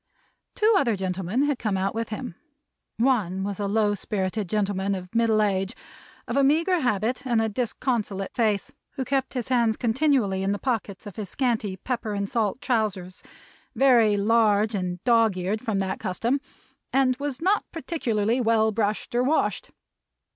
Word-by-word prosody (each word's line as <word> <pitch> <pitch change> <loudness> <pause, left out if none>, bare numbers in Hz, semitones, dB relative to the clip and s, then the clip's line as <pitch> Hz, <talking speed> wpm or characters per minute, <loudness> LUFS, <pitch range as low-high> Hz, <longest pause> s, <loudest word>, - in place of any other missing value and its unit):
Two 435 +1 +4
other 235 - +1
gentlemen 190 +5 -1
had 290 -3 0
come 210 -4 -1
out 195 +1 -1
with 225 0 -3
him. 225 -1 -5 0.6
One 215 -7 +1
was 200 0 -4
a 200 - -1
low 210 0 +2
spirited 200 -1 -2
gentleman 200 -1 0
of 180 0 -8
middle 225 -2 +3
age, 195 -2 -1 0.5
of 235 - -3
a 280 - +4
meagre 330 +6 +3
habit, 245 0 0
and 240 -4 +1
a 225 - +2
disconsolate 220 -3 -2
face; 215 -4 0 0.2
who 265 - -3
kept 270 0 -1
his 250 -1 -3
hands 235 -3 +2
continually 235 -5 +1
in 195 +1 0
the - - -2
pockets 220 -5 -3
of 205 -1 -9
his 205 -4 -5
scanty 225 -7 -1
pepper 230 0 -3
and 200 0 -2
salt 225 +1 0
trousers, 200 -7 -1 0.5
very 235 -6 +5
large 215 0 +3
and 180 -2 -3
dog's 230 -5 +3
eared 195 +4 -2
from 220 -5 -1
that 190 -1 -2
custom; 230 +7 -1 0.5
and 260 -1 +3
was 285 -2 -3
not 385 +5 +2
particularly 245 -8 -1
well 220 -1 +3
brushed 210 0 -2
or 240 - +2
washed. 290 +5 0
220 Hz, 165 wpm, -25 LUFS, 200-250 Hz, 0.6 s, very